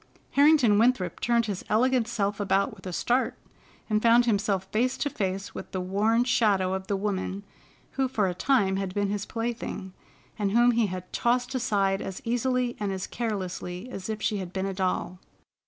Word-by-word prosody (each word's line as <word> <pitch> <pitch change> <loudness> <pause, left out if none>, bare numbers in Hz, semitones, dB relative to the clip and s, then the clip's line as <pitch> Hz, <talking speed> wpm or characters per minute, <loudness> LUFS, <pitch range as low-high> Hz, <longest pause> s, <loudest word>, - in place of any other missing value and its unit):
Harrington 280 -8 +5
Winthrop 225 -7 +2
turned 235 -1 +2
his 200 -4 -4
elegant 245 +1 +2
self 205 -3 -1
about 200 0 +1
with 190 -2 -11
a - - -4
start 245 +8 0 0.5
and 215 -1 +1
found 235 +1 +5
himself 200 -4 +1
face 250 +4 +1
to 290 - -1
face 195 -2 -3
with - - -8
the 185 - -1
worn 210 +6 +2
shadow 205 -7 +2
of 190 0 -4
the 200 - 0
woman 195 -1 -2 0.5
who 270 -1 0
for 220 -6 0
a 180 - -1
time 195 -1 +2
had 195 -1 -3
been 200 -1 0
his 205 0 -3
plaything, 225 -5 -4 0.5
and 200 -1 0
whom 240 +1 +5
he 230 -2 +2
had 185 -1 -7
tossed 245 +2 +1
aside 200 -6 +1
as 190 - -5
easily 245 +1 0
and 205 -2 -1
as 190 -1 -3
carelessly 190 -1 -4
as 195 -2 -6
if 215 0 -4
she 210 - +1
had 185 -3 -5
been 190 0 -2
a 195 - -2
doll. 185 -1 -2
205 Hz, 190 wpm, -27 LUFS, 190-240 Hz, 0.5 s, Harrington